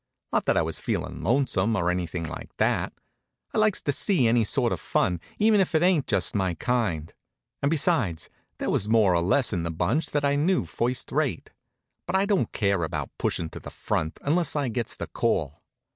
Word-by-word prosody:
Not - - +1
that - - +2
I - - +3
was - - -4
feelin' - - -3
lonesome, 115 -5 +1
or 90 -3 +1
anything 90 -1 -3
like 80 - -6
that. - - +1 0.6
I - - +1
likes 215 -2 +2
to 145 - +1
see 140 - +2
any 115 0 +3
sort 105 - +1
of - - -4
fun, 90 -2 0 0.2
even 215 -1 +4
if 185 -3 +1
it 160 - +3
ain't 180 -6 +3
just 100 -5 +1
my 95 -4 0
kind. 95 -8 -1 0.5
And 140 - +2
besides, 115 - +1 0.3
there - - -2
was 105 - 0
more 110 -5 +4
or 85 - +2
less 110 +8 +2
in 90 - 0
the 85 - -3
bunch 105 - 0
that 145 -1 -1
I 140 0 +2
knew 175 +6 +2
first 125 +2 -2
rate. 140 - -1 0.6
But 180 - -1
I 190 +1 +3
don't 200 -2 +1
care 100 -4 +1
about 80 - -3
pushin' 80 -2 -1
to - - -8
the - - -9
front 80 0 -2
until 160 +1 +1
I 140 -3 -1
gets 115 0 -3
the - - -5
call. 75 0 -1
115 Hz, 205 wpm, -26 LUFS, 90-150 Hz, 0.6 s, even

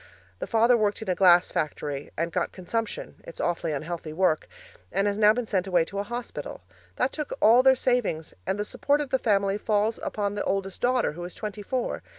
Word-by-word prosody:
The - - -4
father 230 +2 +4
worked 215 -1 0
in 220 - -6
a - - +3
glass 180 -1 +5
factory 145 -2 -3
and 170 +1 -1
got 175 +1 -1
consumption 225 +4 -4
it's 170 - -11
awfully 170 -2 -1
unhealthy 155 +2 -4
work 165 -2 +1 0.4
and 195 - +1
now 210 - +6
has 215 - +6
been 245 -1 -2
sent 195 -3 -1
away 175 -3 +3
to 200 +3 -5
a - - 0
hospital. 240 +3 -6 0.3
That - - +1
took 300 -2 -4
all 230 +4 +6
their 265 0 +6
savings, 245 -12 0
and 195 - 0
the 210 - -1
support 285 +6 +1
of 290 -3 -4
the 265 - +2
family 200 -3 +1
falls 215 +1 0
upon 205 -1 -2
the 205 - -2
oldest 195 -1 -2
daughter, 250 0 +2
who 175 +3 -8
is 175 - -7
twenty 210 -1 -6
four. 250 +4 -2
205 Hz, 210 wpm, -26 LUFS, 175-230 Hz, 0.4 s, now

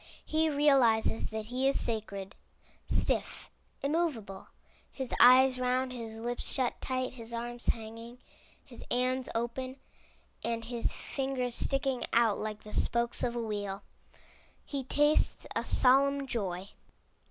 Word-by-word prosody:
He 315 +1 +1
realizes 270 -7 +3
that 220 -1 -5
he 250 +4 0
is 275 - 0
sacred. 200 -4 -4 0.5
Stiff, - - -1 0.3
immovable, 275 - -2 0.4
his 265 -3 -5
eyes 255 +1 +7
round, 255 0 0
his 225 -2 -7
lips 240 +1 -3
shut 255 -2 -1
tight, 255 -1 -2
his 235 -2 -7
arms 240 +1 -3
hanging, 230 +2 -3 0.5
his - - -11
hands 255 +1 0
open 245 +3 -3 0.7
and 230 -1 -2
his 235 0 -2
fingers 265 -3 -3
sticking 270 0 +1
out 230 -3 +3
like 215 -1 -5
the 210 - -10
spokes 235 0 +3
of 240 -1 -1
a - - -1
wheel, 205 -2 -4 0.8
he 280 -2 -4
tastes 295 +4 +2
a - - 0
solemn 275 +2 +3
joy. 195 -6 -3
245 Hz, 130 wpm, -31 LUFS, 225-265 Hz, 0.8 s, eyes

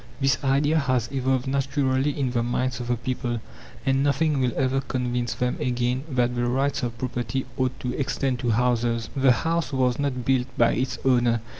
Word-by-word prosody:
This 135 -1 +1
idea 145 +4 +3
has 130 -4 0
evolved 130 -1 0
naturally 135 0 +1
in 135 -3 -1
the 120 -1 +1
minds 125 +1 -1
of 120 - -5
the 120 - +1
people, 120 0 -3 0.5
and 135 -1 +2
nothing 145 +1 +2
will 125 -2 +1
ever 135 0 +1
convince 125 -2 -2
them 125 0 -1
again 125 +2 -1
that 125 -2 +1
the 120 0 0
"rights 135 +3 0
of 120 -2 -3
property" 125 0 -2
ought 130 -1 -1
to 125 - -2
extend 135 -2 -1
to 120 - -1
houses. 115 0 +1
The 135 -1 +5
house 165 +6 0
was 130 -2 +1
not 130 -4 -2
built 130 -1 +2
by 115 - +4
its 130 +2 -1
owner. 120 -3 +3
130 Hz, 185 wpm, -25 LUFS, 120-135 Hz, 0.5 s, The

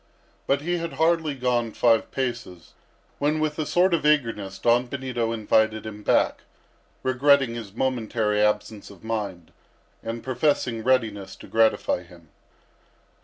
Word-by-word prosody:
But 140 +1 +2
he 175 +3 -1
had 170 0 -5
hardly 160 -2 +1
gone 120 -3 0
five 115 -2 +3
paces, 120 - -5 0.5
when, 150 +2 +1
with 155 0 -1
a 155 - -1
sort 180 +1 +3
of 165 - +1
eagerness, 115 -10 +1
Don 120 +4 +2
Benito 125 -4 -3
invited 110 0 +1
him 105 -1 -7
back, - - +2 0.6
regretting 135 -1 +3
his 110 -4 -7
momentary 110 -4 0
absence 105 0 -1
of 100 -1 -15
mind, 105 -7 -4 0.5
and 115 0 -5
professing 125 -3 0
readiness 110 -6 0
to - - -13
gratify 110 -5 +2
him. 85 -2 -17
120 Hz, 135 wpm, -24 LUFS, 110-140 Hz, 0.6 s, five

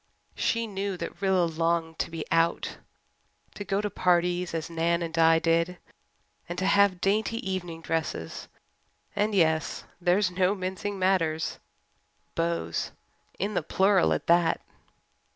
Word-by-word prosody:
She 230 0 0
knew 200 -2 -3
that 170 +3 -6
Rilla 190 -3 +3
longed 165 0 -1
to - - -1
be 165 -2 -5
"out" 165 0 +1 0.7
to 205 - -6
go 195 0 0
to 210 - -2
parties 180 0 +1
as 165 -1 -2
Nan 170 +1 0
and 165 -1 -5
Di 165 0 +5
did, 165 +2 +1 0.7
and 175 - -4
to 190 - -1
have 200 -2 +4
dainty 215 +3 +1
evening 175 -3 -4
dresses 160 - -3 0.7
and 210 0 +1
yes, 160 -4 +1 0.2
there 175 +1 +3
is 200 -3 +1
no 185 +2 +2
mincing 190 +2 -4
matters 175 -4 +1 0.7
beaux! 85 0 -1 0.6
In 200 +3 -2
the 180 - +1
plural, 190 +4 +3
at - - -1
that! 170 -1 +3
175 Hz, 140 wpm, -27 LUFS, 165-195 Hz, 0.7 s, Di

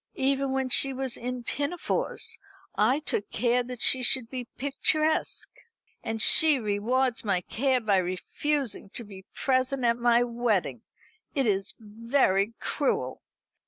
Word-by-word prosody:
Even 270 0 0
when 265 -1 -1
she 270 +1 +3
was 260 -1 0
in 250 0 -5
pinafores 350 - -1 0.3
I 230 +6 +2
took 210 -8 -3
care 245 +2 +1
that 245 -1 -5
she 260 - +5
should 250 -1 0
be 250 -2 -5
picturesque. 305 +3 0 0.5
And 225 0 -3
she 310 +6 +6
rewards 235 +3 0
my 195 -4 0
care 260 +7 0
by 210 -4 +2
refusing 205 +7 -2
to 235 - -2
be 195 -3 -13
present 260 -1 0
at 235 0 +2
my 240 0 +3
wedding. 235 -3 -1 0.5
It 275 -2 +1
is 195 -2 0
very 225 -1 0
cruel." 130 - -2
245 Hz, 135 wpm, -27 LUFS, 220-270 Hz, 0.5 s, she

